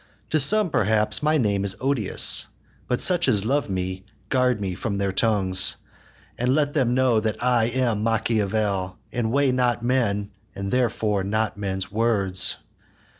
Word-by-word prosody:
To 155 - +2
some 200 +5 +3
perhaps 105 -1 +2
my 155 +1 +2
name 100 -6 0
is 95 -2 -1
odious; 130 -6 +2 0.4
But 125 - -1
such 175 -2 +3
as 105 -1 +2
love 140 0 -1
me, 95 0 -4 0.3
guard 125 -3 +1
me 95 -3 -3
from 100 +2 -4
their 100 -1 -1
tongues, 95 -3 +2 0.6
And 125 +2 +1
let 145 -1 0
them 125 -5 +1
know 130 -3 +2
that 110 +1 -3
I 125 -2 +2
am 120 -3 -1
Machiavel, 105 -4 -1
And 115 -2 -2
weigh 140 0 +2
not 125 -2 0
men, 105 -5 -1 0.2
and 100 0 -5
therefore 110 -5 0
not 110 +3 -1
men's 95 -1 -4
words. 100 -4 +1
110 Hz, 155 wpm, -23 LUFS, 100-125 Hz, 0.6 s, some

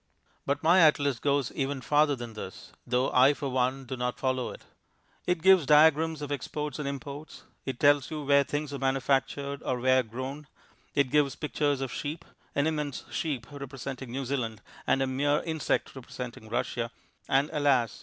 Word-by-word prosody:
But 140 +1 0
my 175 +4 +6
atlas 145 -5 +4
goes 140 -2 +1
even 140 0 -2
farther 145 +4 +3
than 120 -2 -7
this, 105 -3 -9 0.2
though 125 +2 +1
I 130 +3 +5
for 140 -1 -3
one 130 +1 0
do 130 - -4
not 125 0 -2
follow 130 -2 -1
it. - - -10 0.6
It 180 -2 0
gives 190 -6 +6
diagrams 155 0 +5
of 145 - -5
exports 150 +1 -4
and 145 - -3
imports; 140 +2 -7 0.2
it 130 -2 -3
tells 145 -2 +4
you 155 -2 -4
where 140 0 +5
things 145 0 -3
are 140 - -4
manufactured 135 +1 0
or 125 -1 -2
where 130 +1 +4
grown; 130 +5 -6 0.5
it 140 -3 +2
gives 145 -3 +3
pictures 145 -2 -1
of 135 -2 -3
sheep 155 +3 -5 0.3
an 140 - +2
immense 150 -5 -2
sheep 140 -8 -2
representing 135 -2 -7
New 135 +2 -3
Zealand 115 -5 -3 0.2
and 135 - +3
a - - +1
mere 145 +3 +1
insect 160 -4 -1
representing 125 -3 -8
Russia, 120 0 -2 0.4
and 135 +2 +2
alas! 130 -9 +2
140 Hz, 175 wpm, -28 LUFS, 130-145 Hz, 0.6 s, my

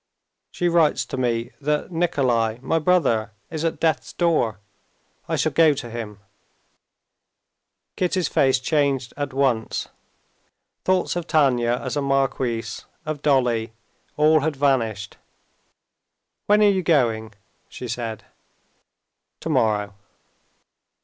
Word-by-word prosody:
"She 175 - -1
writes 170 -3 +3
to 140 - -6
me 120 -2 -1
that 150 +4 -1
Nikolay, 130 -10 +1
my 165 - +1
brother, 135 - +2 0.2
is 160 -1 -3
at 165 - -1
death's 160 -1 0
door. 155 - +1 0.7
I - - +1
shall - - +1
go 160 -3 +4
to 120 -4 -7
him." 105 -3 -7 1.7
Kitty's 180 -2 0
face 135 -1 +3
changed 135 -2 0
at 145 -1 -3
once. 130 -4 0 1.0
Thoughts 185 -1 +1
of 175 -1 -3
Tanya 125 -6 +2
as - - -3
a 145 - 0
marquise, 130 -5 -1 0.2
of 155 -2 -4
Dolly, 120 -6 +1 0.4
all 155 +1 +5
had 155 +1 -1
vanished. 115 -7 0 1.3
"When 210 +1 +5
are - - +6
you 190 -2 +1
going?" 115 -10 +1 0.4
she 125 - -7
said. 115 -3 -5 1.1
"Tomorrow." 105 -2 0
135 Hz, 115 wpm, -23 LUFS, 115-160 Hz, 1.7 s, are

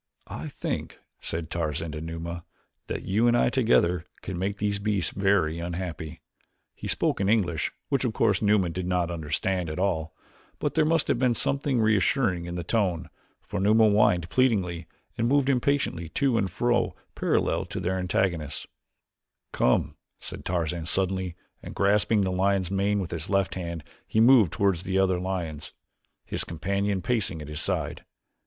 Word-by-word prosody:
"I - - -5
think," - - -4 0.2
said 80 0 -4
Tarzan 80 -1 -2
to 75 +1 -6
Numa, 85 +1 -5 0.4
"that - - -4
you 110 +5 +2
and 120 0 +4
I - - +3
together 90 -10 +2 0.2
can 95 -2 -4
make 100 +2 -1
these 100 -1 -1
beasts 100 -3 0
very 95 -5 +1
unhappy." 85 -2 -5 0.5
He - - -7
spoke - - +1
in 95 - +1
English, 90 -8 +1 0.2
which, 140 -2 +1
of 125 - +1
course, 105 -3 +2
Numa 105 -4 +3
did 90 +2 -4
not 90 -1 0
understand 85 +2 -1
at 75 - -5
all, 80 -4 -1 0.4
but - - -2
there 155 -1 +3
must 165 0 +2
have - - +1
been 125 -2 +3
something 140 -1 0
reassuring 105 -3 +2
in 85 0 -5
the 90 - -3
tone, 90 -3 0 0.3
for - - -4
Numa 110 +3 +5
whined 100 -5 +3
pleadingly 95 -10 +1 0.3
and 115 - +2
moved 140 +1 +3
impatiently 125 - 0
to 130 - +1
and 100 -4 +1
fro 120 +7 +1 0.2
parallel - - 0
with - - -4
their 95 +1 0
antagonists. 90 -5 -1 0.9
"Come," 65 - +1 0.2
said - - -8
Tarzan 85 -2 -1
suddenly 95 -1 0 0.3
and - - -9
grasping 105 +2 +3
the 95 -1 0
lion's 95 -1 +1
mane 100 +1 +1
with 90 - -5
his 85 0 -4
left 100 -1 +1
hand 85 -3 -5 0.2
he 110 - +1
moved 115 - +6
toward 100 -3 +2
the 95 +2 -2
other 95 -2 +2
lions, 85 -5 -4 0.5
his - - -3
companion 100 +3 -1
pacing 110 -9 0
at 75 - -8
his 75 - -4
side. - - -2
95 Hz, 165 wpm, -27 LUFS, 85-105 Hz, 0.9 s, moved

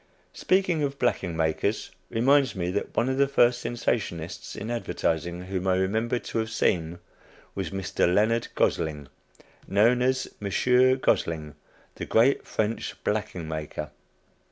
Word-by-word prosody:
Speaking 185 -4 +1
of 140 -1 -1
"blacking 90 -10 0
makers," 80 -1 -1 0.2
reminds 135 +2 +3
me 90 -1 -2
that 100 - -3
one 120 - +3
of 130 +1 -1
the 140 - +5
first 120 -3 +3
sensationists 100 -8 -3
in 110 +3 -5
advertising 85 -6 -2
whom 95 0 -3
I 95 - +3
remember 110 +6 0
to 115 - -4
have 110 0 -2
seen, 85 -6 0 0.6
was 95 - -3
Mr. 95 -2 0
Leonard 110 +4 +2
Gosling, 75 -4 0 0.6
known 115 +5 +3
as 130 +1 +1
"Monsieur 125 +6 +3
Gosling, 80 - 0 0.4
the - - -6
great 120 +5 +3
French 110 +1 -2
blacking 85 -3 -2
maker." 75 -1 -5
105 Hz, 135 wpm, -26 LUFS, 85-125 Hz, 0.6 s, the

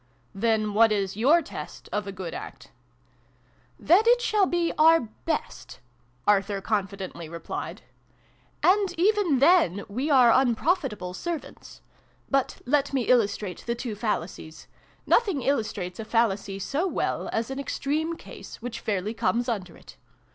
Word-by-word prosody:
" 120 - -38
Then 215 -2 +1
what 225 +1 +5
is 195 -2 -1
your 290 +10 +4
test - - -9
of 210 -1 -2
a - - -4
good 185 -3 -6
act? - - -9 0.4
" 125 0 -37
" 120 0 -36
That 395 +7 +6
it 485 +1 +6
shall 425 -5 +2
be 345 -1 0
our 325 +1 +6 0.2
best'' 305 - -4 0.5
Arthur 200 -1 +2
con 205 0 0
fidently 185 -4 -8
replied. 170 0 -6 0.4
" - - -36 0.2
And 395 -4 -3
even 390 -6 +3
then 270 - +4
' - - -30
we 250 +9 -3
are 255 -5 +6
unprofitable 255 - +1
servants.' 335 - -7 0.5
But 275 -2 0
let 280 +2 +1
me 265 -3 +1
illustrate 205 -5 +1
the 235 - 0
two 240 -2 -5
fallacies. 185 -7 -4 0.4
Nothing 390 - +2
illustrates 215 -9 -2
a - - -3
fal 230 +1 +3
lacy 195 0 -6
so 295 - -1
well - - -2
as 225 +3 -2
an 270 - -4
extreme 305 +4 -2
case, - - -11
which 240 0 -6
fairly 205 0 -2
comes 235 +1 0
under 190 -8 -4
it. - - -16
230 Hz, 160 wpm, -26 LUFS, 195-295 Hz, 0.5 s, That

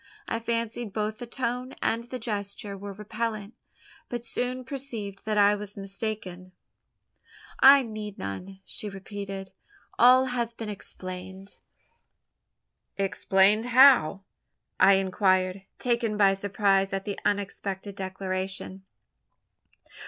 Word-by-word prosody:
I 225 - -1
fancied 230 -2 -3
both 215 +1 -2
the 245 - -6
tone 250 +1 -3
and 230 +1 0
the 245 +2 -6
gesture 205 -3 -4
were 200 +1 -7
repellant; 215 +1 -4 0.6
but 240 -1 -4
soon 250 +2 -2
perceived 230 -7 -6
that 215 -1 0
I 205 0 +6
was 205 -1 -6
mistaken. 195 -2 -5 1.1
"I 275 +1 +9
need 215 -3 -6
none," 185 - -6
she 210 - -5
repeated, 195 0 -7 0.5
"all 255 +2 +7
has 235 -1 -1
been 225 -2 -6
explained." 190 -1 -8 1.4
"Explained! 195 +2 +3
How?" 245 - +6 0.6
I 195 +1 +7
inquired, 190 0 +2
taken 235 -3 0
by 200 -2 +5
surprise 195 0 +1
at 195 0 -2
the 205 -2 -4
unexpected 200 -1 -2
declaration. 190 0 -4
205 Hz, 110 wpm, -27 LUFS, 195-230 Hz, 1.4 s, I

